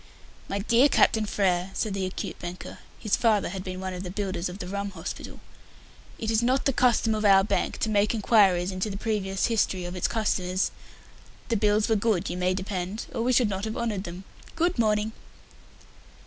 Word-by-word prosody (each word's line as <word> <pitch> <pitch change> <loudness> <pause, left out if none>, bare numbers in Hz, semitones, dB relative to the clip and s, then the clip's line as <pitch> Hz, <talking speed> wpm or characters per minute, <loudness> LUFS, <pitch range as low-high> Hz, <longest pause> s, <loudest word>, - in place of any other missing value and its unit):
"My 200 - -1
dear 235 +7 +4
Captain 220 -4 +3
Frere," 185 -3 +1
said 210 +2 -1
the 195 -1 -1
acute 185 - -6
banker 175 +1 -7 0.2
his 215 - 0
father 220 -3 +2
had 190 +1 -5
been 185 -1 -6
one 190 0 -4
of 180 - -5
the 185 - -6
builders 190 -2 -3
of 180 - -8
the 180 - -6
"Rum 200 +1 -3
Hospital" 190 - -7 0.8
"it 220 -1 -2
is 220 0 +3
not 255 +3 +1
the 275 - +2
custom 235 -3 +3
of 215 0 -2
our 195 -2 +6
bank 205 - -1
to - - +1
make 205 +2 +2
inquiries 195 -4 +3
into 185 +3 -2
the 195 - -5
previous 195 -3 -1
history 195 -5 0
of 175 +1 -5
its 180 - 0
customers. 185 -4 0 0.8
The 230 - +2
bills 210 +1 +2
were 225 - +2
good, 205 -4 0
you - - -4
may 180 0 +1
depend, 190 +1 -4
or - - -2
we 245 +2 +2
should 245 -2 +4
not 195 -1 -3
have 220 +1 -4
honoured 210 -5 -2
them. 175 +2 -7 0.3
Good 340 -3 0
morning!" 215 -1 +2
200 Hz, 200 wpm, -26 LUFS, 185-220 Hz, 0.8 s, our